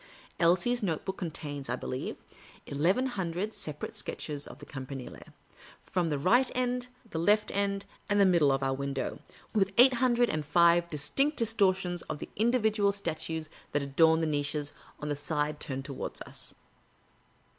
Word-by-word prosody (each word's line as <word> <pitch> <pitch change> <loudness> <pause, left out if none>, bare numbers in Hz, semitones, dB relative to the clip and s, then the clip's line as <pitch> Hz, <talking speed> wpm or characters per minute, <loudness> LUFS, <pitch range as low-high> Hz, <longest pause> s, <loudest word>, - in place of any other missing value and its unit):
Elsie's 180 +9 +3
note 165 -7 -1
book 190 - -3
contains, 145 -5 -5
I - - +1
believe, 130 - -4 0.5
eleven 175 - +2
hundred 195 -3 -2
separate 150 -1 -6
sketches 145 -2 -4
of - - -10
the - - -11
Campanile, 135 -2 -7 0.6
from 180 -2 0
the 150 -3 0
right 240 - +4
end, 250 0 0 0.2
the 160 - -2
left 210 +5 +3
end, 200 0 -1 0.2
and 205 0 +3
the 200 - +7
middle 170 -6 +5
of 135 0 0
our 135 0 +1
window, 140 0 -3 0.3
with 195 -3 +2
eight 255 +2 +8
hundred 245 -1 +3
and 155 -1 -1
five 170 +3 +4
distinct 170 - 0
distortions 190 -6 +2
of - - -2
the - - -7
individual 220 -2 +3
statues 160 -4 -3 0.3
that 145 - +1
adorn 160 +4 +4
its 160 - +1
niches 145 0 -1 0.3
on 150 - -5
the 145 - 0
side 150 0 -1
turned 135 -1 -2
towards 135 - -5
us. - - -8
170 Hz, 160 wpm, -30 LUFS, 145-205 Hz, 0.6 s, eight